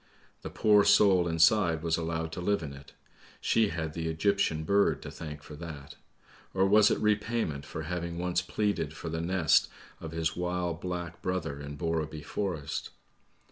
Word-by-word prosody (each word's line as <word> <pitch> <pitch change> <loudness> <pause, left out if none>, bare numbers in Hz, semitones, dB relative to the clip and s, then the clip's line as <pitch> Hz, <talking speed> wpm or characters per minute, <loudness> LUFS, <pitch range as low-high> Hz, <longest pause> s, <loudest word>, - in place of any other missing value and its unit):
The - - -6
poor 105 -1 +4
soul 95 -5 +5
inside 85 0 +3
was 80 -1 +2
allowed 80 -1 -3
to 90 - -5
live 100 0 +1
in 70 -2 -6
it; 70 +1 -13 0.5
she 115 -1 +2
had 80 -3 -4
the 80 0 -3
Egyptian 80 -1 +1
bird 100 +5 +2
to - - -7
thank 75 -2 -8
for 75 - -10
that; 75 -4 -8 0.6
or 95 0 +4
was 105 +1 +6
it - - +1
repayment 105 -8 0
for 80 - -5
having 85 +1 -4
once 90 0 0
pleaded 90 -5 -1
for 85 - -6
the 80 0 -3
nest 85 -1 +3 0.3
of 80 - -7
his 80 0 -1
wild 90 -1 -2
black 90 -2 -5
brother 80 -6 -2
in 70 0 -7
Borreby 80 -1 -2
Forest? 80 -3 -3
85 Hz, 170 wpm, -29 LUFS, 80-95 Hz, 0.6 s, was